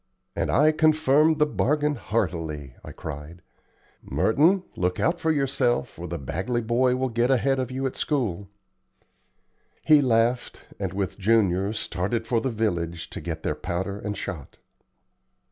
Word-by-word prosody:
"And -, -, -1 dB
I 150 Hz, +4 st, +5 dB
confirm 155 Hz, 0 st, +3 dB
the 150 Hz, -, +4 dB
bargain 150 Hz, 0 st, +1 dB
heartily," 80 Hz, -, -3 dB
I -, -, -9 dB
cried. 80 Hz, +3 st, -8 dB, 0.6 s
"Merton, 170 Hz, -, +2 dB
look 90 Hz, 0 st, -1 dB
out 170 Hz, +1 st, +1 dB
for 160 Hz, -, 0 dB
yourself, 135 Hz, -, 0 dB
or 90 Hz, -, -5 dB
the 85 Hz, +1 st, -4 dB
Bagley 95 Hz, -, -2 dB
boy 125 Hz, +3 st, +2 dB
will 130 Hz, 0 st, -1 dB
get 120 Hz, +2 st, +1 dB
ahead 135 Hz, +1 st, +2 dB
of 130 Hz, -2 st, -2 dB
you 130 Hz, +1 st, -3 dB
at 130 Hz, -, -2 dB
school." 100 Hz, -, -2 dB, 1.4 s
He 155 Hz, -2 st, +7 dB
laughed 120 Hz, -1 st, +1 dB
and, -, -, -2 dB
with 100 Hz, +1 st, -3 dB
Junior, 100 Hz, -2 st, +2 dB
started 110 Hz, +2 st, -2 dB
for 115 Hz, 0 st, +1 dB
the 130 Hz, -, -1 dB
village, 85 Hz, -8 st, -2 dB
to -, -, -6 dB
get 80 Hz, -2 st, -5 dB
their -, -, 0 dB
powder 95 Hz, +3 st, -4 dB
and 105 Hz, -2 st, -4 dB
shot. 80 Hz, -9 st, -7 dB
115 Hz, 150 wpm, -25 LUFS, 90-135 Hz, 1.4 s, He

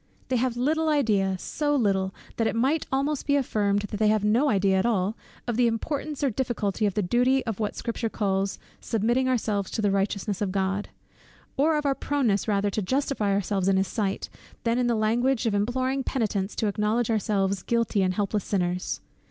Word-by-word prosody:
They 255 Hz, -, +2 dB
have 240 Hz, 0 st, 0 dB
little 315 Hz, +5 st, +1 dB
idea, 210 Hz, -10 st, +2 dB
so 290 Hz, +9 st, -1 dB
little, 195 Hz, -6 st, +1 dB, 0.3 s
that 225 Hz, -, +2 dB
it -, -, -1 dB
might 270 Hz, +7 st, +1 dB
almost 275 Hz, +2 st, -1 dB
be 285 Hz, -, +3 dB
affirmed 205 Hz, -7 st, +1 dB
that 205 Hz, 0 st, -4 dB
they 215 Hz, +1 st, +3 dB
have 215 Hz, -1 st, +2 dB
no 235 Hz, +8 st, +3 dB
idea 195 Hz, -3 st, +3 dB
at 190 Hz, -, 0 dB
all, 205 Hz, -2 st, +1 dB, 0.3 s
of 240 Hz, -2 st, -2 dB
the 245 Hz, -1 st, +4 dB
importance 285 Hz, +6 st, -3 dB
or 275 Hz, -, +2 dB
difficulty 215 Hz, -4 st, -1 dB
of 200 Hz, -, -3 dB
the 210 Hz, -, +1 dB
duty 250 Hz, +7 st, +2 dB
of 225 Hz, -3 st, -3 dB
what 210 Hz, -2 st, -1 dB
the -, -, -15 dB
Scripture 230 Hz, -1 st, -2 dB
calls 195 Hz, -2 st, -1 dB, 0.2 s
"submitting 240 Hz, +4 st, +1 dB
ourselves 210 Hz, -6 st, 0 dB
to -, -, -4 dB
the 205 Hz, -2 st, +2 dB
righteousness 200 Hz, 0 st, -1 dB
of 200 Hz, -2 st, 0 dB
God;" 195 Hz, +1 st, -1 dB, 0.7 s
or 305 Hz, +3 st, +3 dB
of 300 Hz, -, -2 dB
our 275 Hz, -, +3 dB
proneness 260 Hz, -9 st, 0 dB
rather 205 Hz, -1 st, +1 dB
to 215 Hz, -, -1 dB
justify 260 Hz, -1 st, 0 dB
ourselves 195 Hz, -1 st, 0 dB
in 195 Hz, -1 st, +4 dB
his 190 Hz, 0 st, +1 dB
sight, 200 Hz, -4 st, -2 dB, 0.4 s
than 235 Hz, +1 st, +1 dB
in 245 Hz, -, +2 dB
the 235 Hz, -, +2 dB
language 235 Hz, +4 st, +1 dB
of 225 Hz, -, +1 dB
imploring 255 Hz, +6 st, 0 dB
penitents 215 Hz, -7 st, -1 dB
to -, -, -1 dB
acknowledge 215 Hz, +3 st, 0 dB
ourselves 200 Hz, -3 st, 0 dB
guilty 230 Hz, -2 st, +1 dB
and 185 Hz, -1 st, +1 dB
helpless 205 Hz, 0 st, 0 dB
sinners. 180 Hz, -2 st, -1 dB
215 Hz, 200 wpm, -26 LUFS, 200-255 Hz, 0.7 s, the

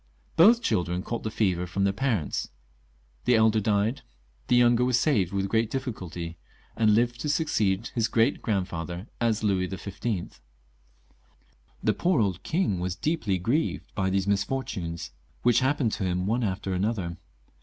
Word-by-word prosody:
Both 230 Hz, +8 st, +6 dB
children 90 Hz, -, 0 dB
caught 115 Hz, 0 st, -4 dB
the 110 Hz, -, -3 dB
fever 90 Hz, -5 st, 0 dB
from 95 Hz, +3 st, -1 dB
their 100 Hz, 0 st, +2 dB
parents; 110 Hz, -, -1 dB, 0.8 s
the 125 Hz, -, +4 dB
elder 110 Hz, -1 st, +4 dB
died, 105 Hz, +5 st, +1 dB, 0.5 s
the -, -, +3 dB
younger 120 Hz, 0 st, +5 dB
was 125 Hz, -1 st, +3 dB
saved 105 Hz, -, +2 dB
with 100 Hz, 0 st, -1 dB
great 110 Hz, +2 st, +1 dB
difficulty, 90 Hz, -, -5 dB, 0.4 s
and 110 Hz, -2 st, +3 dB
Uved 120 Hz, +3 st, +3 dB
to 150 Hz, -, -3 dB
succeed 110 Hz, -, 0 dB
his 115 Hz, -1 st, +1 dB
great 115 Hz, +2 st, +2 dB
grandfather 90 Hz, -3 st, -3 dB
as 115 Hz, -2 st, +1 dB
Louis 95 Hz, -3 st, +1 dB
XV. 95 Hz, -, -4 dB, 1.4 s
The -, -, +3 dB
poor 175 Hz, -5 st, +1 dB
old 95 Hz, -5 st, 0 dB
king 155 Hz, -, 0 dB
was 90 Hz, 0 st, -2 dB
deeply 110 Hz, -, 0 dB
grieved 120 Hz, -, -1 dB
by 95 Hz, -2 st, 0 dB
these 95 Hz, 0 st, +1 dB
misfor 100 Hz, +7 st, 0 dB
tunes, 85 Hz, -2 st, -5 dB, 0.3 s
which 120 Hz, -2 st, +5 dB
happened 130 Hz, -3 st, +1 dB
to 100 Hz, -, -3 dB
him 90 Hz, 0 st, 0 dB
one 115 Hz, +4 st, 0 dB
after 95 Hz, -2 st, -2 dB
another. 95 Hz, -3 st, -1 dB
105 Hz, 155 wpm, -27 LUFS, 95-120 Hz, 1.4 s, Both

